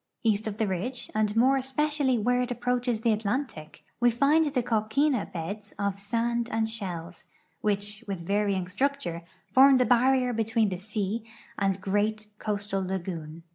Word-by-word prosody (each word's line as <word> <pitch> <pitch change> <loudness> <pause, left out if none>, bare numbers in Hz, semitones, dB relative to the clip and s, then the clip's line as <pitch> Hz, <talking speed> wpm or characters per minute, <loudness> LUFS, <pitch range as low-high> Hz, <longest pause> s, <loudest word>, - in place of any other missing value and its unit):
East 215 -1 +1
of 210 -1 -4
the 220 - +1
ridge, 220 +8 -3
and 215 -1 +1
more 260 +4 +5
especially 270 0 +1
where 245 +3 +2
it 250 - -2
approaches 245 -1 -1
the 230 -1 +3
Atlantic, 215 - -3 0.2
we 240 +1 +5
find 285 +7 +3
the 275 -4 0
coquina 235 +3 +1
beds 200 +5 -6
of 200 -1 -1
sand 235 +3 -1
and 225 0 +1
shells, 180 -6 -6 0.3
which, 205 +1 -1
with 190 -4 -4
varying 200 -1 0
structure, 255 -4 -1 0.3
form 270 +1 +8
the 250 - +3
barrier 250 +1 +3
between 225 -1 +1
the 185 -2 -4
sea 210 +2 -3 0.4
and 195 -1 +2
the - - -13
great 210 +2 0
coastal 205 -2 -2
lagoon. 170 -4 -5
215 Hz, 160 wpm, -27 LUFS, 200-245 Hz, 0.4 s, form